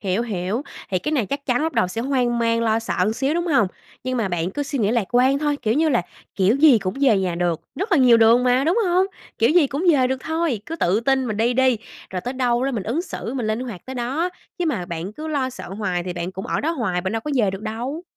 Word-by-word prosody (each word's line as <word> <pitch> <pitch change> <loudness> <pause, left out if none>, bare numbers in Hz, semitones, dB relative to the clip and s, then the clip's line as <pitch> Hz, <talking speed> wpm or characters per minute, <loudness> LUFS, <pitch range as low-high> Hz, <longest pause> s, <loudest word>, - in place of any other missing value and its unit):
Hiểu, 195 +3 0
hiểu, 205 +2 -2 0.3
thì 185 - +1
cái 300 - -3
này 245 -9 +1
chắc 280 0 -4
chắn 250 +3 +1
lúc 320 -1 -1
đầu 225 -7 +1
sẽ 225 - -4
hoang 245 -2 0
mang, 230 0 +1
lo 220 0 +2
sợ 215 -2 0
xíu 270 +5 0
đúng 345 +1 -1
hông? 275 - +3 0.4
Nhưng 255 0 -1
mà 220 -5 0
bạn 175 0 -1
cứ 290 +9 -3
suy 280 -1 -3
nghĩ 210 -1 +2
lạc 235 -3 +1
quan 260 +3 +4
thôi. 295 -1 0
Kiểu 220 +1 +1
như 315 +2 +3
là, 245 -9 +2 0.3
kiểu 200 +6 +3
gì 280 -6 +6
cũng 185 +1 -3
về 260 -8 +4
nhà 185 -2 -1
được, 170 -2 -1 0.2
rất 390 +2 -2
là 330 - +5
nhiều 250 -3 +6
đường 230 +2 +5
mà, 250 +2 +3
đúng 345 +9 +2
hông? 365 +2 +3 0.3
Kiểu 230 +3 +4
gì 330 -2 +5
cũng 285 +6 -3
về 260 -3 +3
được 265 0 -2
thôi, 320 -8 -1
cứ 330 - -5
tự 195 - +1
tin 265 +1 +1
mình 215 - -3
đi 230 +3 +2
đi, 260 -3 +3 0.3
rồi 185 - -3
tới 245 +7 -4
đâu 245 -1 +1
đó 275 - 0
mình 230 -7 -2
ứng 245 - -1
xử 265 -8 -6
mình 245 -5 -2
linh 215 +2 -1
hoạt 230 -8 -7
tới 260 - -6
đó, 265 +8 -1 0.3
chứ 355 - 0
mà 185 - -1
bạn 170 +2 -5
cứ 310 +7 -7
lo 275 -4 -1
sợ 255 - -9
hoài 190 -2 -2
thì 180 0 -4
bạn 175 +1 -4
cũng 190 +1 -6
ở - - -1
đó 315 - 0
hoài, 220 - -1
bạn 190 +2 -3
đâu 225 - -1
có 300 - -5
về 220 -7 +2
được 195 +2 -7
đâu. 240 +9 -4
240 Hz, 280 wpm, -22 LUFS, 205-280 Hz, 0.4 s, gì